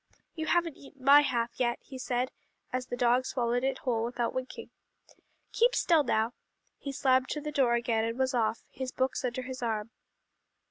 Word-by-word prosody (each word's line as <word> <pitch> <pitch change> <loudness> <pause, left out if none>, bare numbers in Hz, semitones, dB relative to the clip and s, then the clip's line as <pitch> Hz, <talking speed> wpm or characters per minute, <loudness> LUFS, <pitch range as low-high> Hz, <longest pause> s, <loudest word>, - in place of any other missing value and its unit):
"You 315 -1 -4
haven't 345 -3 +1
eaten 275 -2 -15
my 285 +1 +9
half 240 -4 -1
yet," 240 -1 +1
he 260 - -10
said 250 0 -1 0.4
as 255 0 -2
the 245 - -4
dog 245 +1 +3
swallowed 245 0 0
it 265 0 0
whole 230 -3 -1
without 240 0 -2
winking. 255 0 -6 0.8
"Keep 480 +2 +3
still 330 -4 +4
now." 225 -2 +1 0.5
He 280 - -5
slammed 260 -2 +2
to 300 - -2
the 300 0 -5
door 260 -5 +3
again, 235 -2 +1
and 230 +1 -2
was 260 0 +1
off, 230 -2 0
his 260 -1 -5
books 260 0 -1
under 255 +1 -2
his 255 0 -7
arm. 225 -2 -2
255 Hz, 185 wpm, -30 LUFS, 240-270 Hz, 0.8 s, my